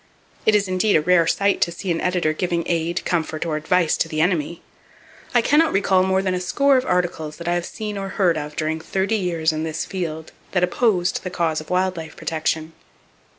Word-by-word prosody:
It 215 - +6
is 200 -1 +2
indeed 185 +3 +2
a 155 - +4
rare 170 0 +3
sight 200 +3 +1
to 170 - +2
see 175 +2 -4
an 165 - -1
editor 180 -4 +1
giving 170 +1 -1
aid, 170 0 -1
comfort 160 -2 -1
or 160 -2 -1
advice 160 +2 +2
to - - 0
the 155 - -4
enemy. 170 0 0 0.7
I 240 - +5
can 295 +5 +4
not 325 -1 +3
recall 190 -1 +3
more 190 +1 +1
than 185 -1 0
a 180 - -2
score 275 +9 +3
of 255 0 +1
articles 170 -4 -1
that 170 - -8
I 175 - +2
have 175 0 -1
seen 210 -2 -5
or 195 - -4
heard 185 -3 +2
of 150 -1 -5
during 155 +1 -1
thirty 190 +6 -1
years 170 -4 0
in 155 - -3
this 160 0 -3
field 160 -4 -5 0.2
that 180 -2 +2
opposed 180 -1 +1
the 185 - -3
cause 165 -3 -1
of 155 - -13
wild 185 0 +1
life 160 -1 -7
protection. 160 0 -2
175 Hz, 220 wpm, -22 LUFS, 160-190 Hz, 0.7 s, It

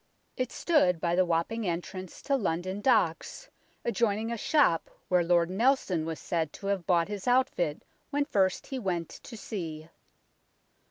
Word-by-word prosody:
It 255 -1 -2
stood 185 - +2
by 170 +1 0
the 185 0 +3
Wapping 180 +6 0
entrance 180 +1 -5
to 280 - +1
London 185 -3 -2
Docks, 220 - +1 0.3
adjoining 225 -1 0
a - - -1
shop 230 - +2 0.2
where 180 -1 +4
Lord 170 0 +2
Nelson 195 - +1
was 160 -1 -4
said 160 -3 -1
to 200 - -10
have 185 -4 -6
bought 170 -2 +3
his 205 0 -6
outfit 245 - +1 0.3
when 290 0 0
first 190 - +1
he 265 - -4
went 175 -6 -2
to 235 - -10
sea. 165 -7 -6
185 Hz, 155 wpm, -29 LUFS, 170-235 Hz, 0.3 s, where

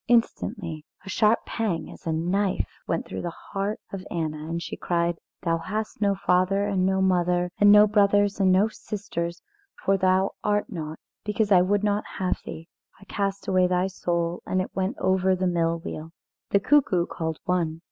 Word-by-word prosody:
Instantly 210 -8 0 0.2
a - - -8
sharp 215 +3 +2
pang 210 -8 -2
as - - -12
a - - +1
knife 180 +5 -1
went - - -1
through - - -5
the 175 - -3 0.2
heart 200 +2 -1
of 190 -1 -5
Anna, 155 -2 -3
and 170 0 -2
she - - -5
cried: 170 -1 -1 0.2
"Thou 165 -2 +1
hast 210 +5 -4
no 200 -1 +3
father 190 +1 +2
and 190 -2 +1
no 190 0 +2
mother 180 -1 +2
and 205 0 +7
no 210 0 +9
brothers 205 -1 +3
and 190 -1 +4
no 190 +3 +4
sisters, 195 -5 -5 0.4
for 195 0 +4
thou 190 0 +2
art 210 +3 0
not, 160 -4 -5 0.3
because 210 0 0
I 180 -2 +7
would 200 +3 +1
not 210 0 +1
have 185 -1 -1
thee. 165 +1 -8 0.3
I - - -15
cast 195 0 -3
away 185 -1 +3
thy 180 0 +1
soul, 175 -2 -2
and 185 - +1
it 185 - -4
went 190 +5 -1
over 190 0 +2
the 185 0 -1
mill 170 -2 +1
wheel." 160 0 -7 0.4
The 200 - +4
cuckoo 200 -9 +3
called 160 -2 -4
one. 170 -3 0
185 Hz, 185 wpm, -25 LUFS, 170-205 Hz, 0.4 s, no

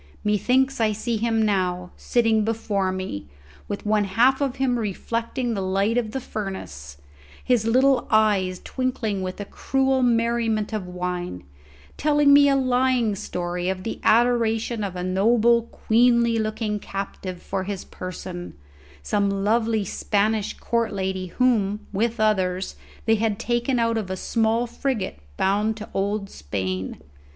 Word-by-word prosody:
Methinks 250 +5 +2
I 215 -1 +3
see 225 +2 -2
him 225 0 +1
now, 180 -3 0
sitting 225 -3 +2
before 210 -4 -1
me, 185 - -5 0.4
with 205 0 -5
one 210 -1 +2
half 245 +8 +3
of 275 -2 0
him 255 -3 +1
reflecting 230 +3 -2
the 200 - -2
light 195 +4 +1
of 240 -3 0
the 265 - -3
furnace, 75 - -6 0.5
his 240 -3 +2
little 260 +2 +3
eyes 205 -4 +3
twinkling 245 -6 -2
with 185 +1 -5
a 205 - -4
cruel 265 +4 0
merriment 230 -3 +1
of 205 -4 -3
wine, 180 - -4 0.5
telling 295 -1 +4
me 285 0 +7
a 275 - +3
lying 255 -3 +2
story 180 -2 -3
of 185 -1 -3
the 225 - -4
adoration 230 -1 +2
of 190 -2 -4
a 180 - -3
noble, 230 +5 +3
queenly 235 0 +3
looking 215 -1 -2
captive 195 -2 -6
for 190 +1 -3
his 200 -1 -5
person 180 -1 -7 0.5
some 200 - +1
lovely 215 +2 +1
Spanish 210 +2 0
court 235 -1 0
lady 190 -1 -2
whom, 210 -2 +1
with 230 +3 0
others, 190 -4 +1 0.3
they 225 0 +4
had 215 -1 0
taken 240 +3 0
out 230 -1 +1
of 200 -4 -5
a 190 - -3
small 225 +3 +1
frigate 235 - -3 0.2
bound 210 +3 +1
to 215 - -7
old 200 +1 -1
Spain. 95 - -4
215 Hz, 145 wpm, -24 LUFS, 190-235 Hz, 0.5 s, me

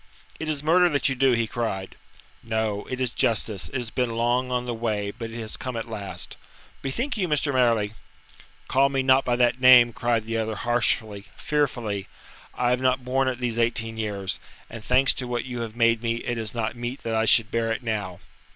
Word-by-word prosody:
"It 160 - -3
is 150 -2 -2
murder 175 +3 +5
that 145 -2 +1
you - - 0
do," 135 0 +3
he 115 -1 +1
cried. 105 -4 -4 0.5
"No; 110 -2 -2
it 130 - -4
is 130 -3 0
justice. 110 -6 0
It - - -11
has 120 -4 -3
been 125 -3 -1
long 120 +2 +1
on 125 0 -1
the 120 - -2
way, 105 -3 -2
but 115 +1 -7
it 115 +1 -7
has 110 -2 -2
come 130 -2 -5
at 115 - -4
last." 105 -3 -6 0.4
"Bethink 235 - -2
you, 185 -4 0
Mr. 150 -2 +1
Marleigh 115 -5 +2 0.4
" - - -25
"Call 135 +1 +3
me 135 -1 0
not 130 +1 +5
by 120 - +2
that 120 +1 +2
name," 125 -2 +8
cried 115 -2 0
the 115 0 -2
other 110 0 -2
harshly, 110 -3 -1
fearfully. 120 -9 -1 0.5
"I 125 0 +2
have 125 0 +1
not 130 0 +1
borne 130 +1 +1
it 130 -1 -2
these 120 -2 -1
eighteen 115 -1 0
years, 100 -4 -3 0.3
and 115 -1 -8
thanks 130 +3 +4
to 125 - -4
what 120 -1 -2
you 125 -2 -5
have 115 -1 -5
made 115 -1 +3
me, 115 -1 0
it 120 -2 -2
is 110 0 -3
not 115 0 -2
meet 120 +3 -5
that 115 - -2
I 110 0 +2
should 110 -1 +4
bear 115 -1 0
it 115 - -3
now." 100 -6 -3
120 Hz, 215 wpm, -25 LUFS, 110-130 Hz, 0.5 s, name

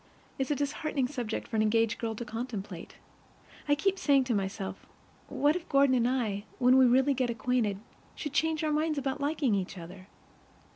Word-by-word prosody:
It's 265 - -1
a 295 - +1
disheartening 285 -1 -1
subject 245 -5 -4
for - - -5
an - - +3
engaged 225 +1 +2
girl 225 -1 -2
to 240 - -6
contemplate. 225 -3 -6 0.7
I 290 - +4
keep 390 +6 0
saying 280 -5 +4
to 250 -2 -1
myself, 195 -1 -4 0.4
what 295 +2 +2
if 360 - -5
Gordon 275 -1 +4
and 245 -1 +3
I, 215 -6 -1
when 250 0 +5
we 260 -1 +7
really 265 +3 +4
get 255 -2 0
acquainted, 230 -3 0 0.4
should 295 -2 -5
change 320 +1 +1
our 305 -1 +1
minds 305 0 0
about 275 +1 -2
liking 285 -4 +1
each 195 -1 -2
other? 180 +2 -10
255 Hz, 185 wpm, -29 LUFS, 220-285 Hz, 0.7 s, we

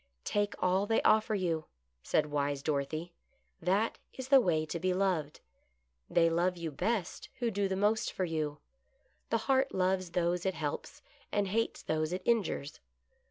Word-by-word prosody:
" 60 0 -47
Take 205 0 0
all 185 +2 +1
they 225 - +3
offer 215 0 +4
you," 165 -5 -1 0.4
said 150 - +2
wise 140 -1 -1
Dorothy. 155 +4 -2 0.5
"That 195 +6 +1 0.2
is 260 0 -6
the 270 -1 +8
way 160 -7 +1
to 170 +2 -4
be 185 +1 +1
loved. 180 -6 0 0.7
They 165 -1 +4
love 175 +2 +1
you 165 -2 -4
best 205 +5 -2
who 240 -3 0
do 200 -1 0
the 190 - -1
most 210 +3 +1
for 185 - -1
you. 155 -3 -2 0.7
The 230 - +2
heart 270 0 +2
loves 185 -1 +1
those 175 0 +1
it 190 -1 0
helps, 145 -2 -4 0.3
and 205 -2 +1
hates 225 +3 -1
those 155 +1 -1
it 185 - -3
injures. 195 -10 0
180 Hz, 165 wpm, -32 LUFS, 155-205 Hz, 0.7 s, the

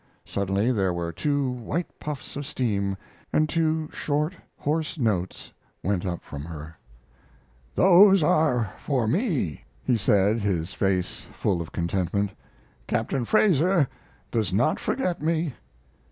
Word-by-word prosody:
Suddenly 100 +4 0
there 95 -6 +1
were 85 -1 -2
two 145 - 0
white 125 +8 -4
puffs 145 -4 -6
of 145 - -3
steam, 100 -9 -1 0.3
and 155 - +3
two 160 0 +1
short, 150 +3 0 0.2
hoarse 160 +3 -1
notes 100 - -1 0.3
went 95 0 0
up 85 -1 -3
from 70 -1 -7
her. 80 0 -8 1.0
"Those 190 0 +7
are 125 -9 +2
for 130 -6 0
me," 140 - 0 0.2
he 125 -3 +2
said, 105 +1 +3
his 95 -5 -1
face 95 -2 -1
full 90 -4 0
of 80 - -7
contentment. 95 +3 -1 0.6
"Captain 115 +2 0
Fraser 180 - +4 0.4
does 110 -6 0
not 120 +11 +2
forget 185 - -1
me." 160 -2 0
120 Hz, 125 wpm, -26 LUFS, 95-155 Hz, 1.0 s, Those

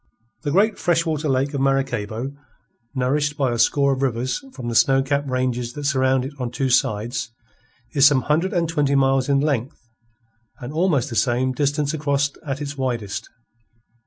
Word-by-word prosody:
The 150 - -2
great 200 +6 +2
freshwater 165 -3 0
lake 135 +2 0
of 140 - -1
Maracaybo, 135 -3 -1 0.6
nourished 145 +3 0
by 135 -4 +1
a 120 - -2
score 140 +2 +3
of 135 - -4
rivers 130 - -1
from 125 - -7
the 120 - -2
snow 135 +3 +4
capped 140 0 -1
ranges 125 -2 -1
that 145 - -7
surround 130 -2 +2
it 140 - -6
on 125 -2 -2
two 130 +1 -1
sides, 120 +1 0 0.6
is 140 -1 +7
some 135 -4 +3
hundred 165 +6 +1
and 175 -4 0
twenty 145 -3 +1
miles 135 0 +2
in 140 -1 +3
length 140 -4 -1 0.8
and 125 +4 -7
almost 155 -6 +1
the - - -4
same 125 +2 +1
distance 145 +3 0
across 145 -2 0
at 140 -2 -4
its 140 0 -5
widest. 120 -6 -3
135 Hz, 170 wpm, -22 LUFS, 125-145 Hz, 0.8 s, is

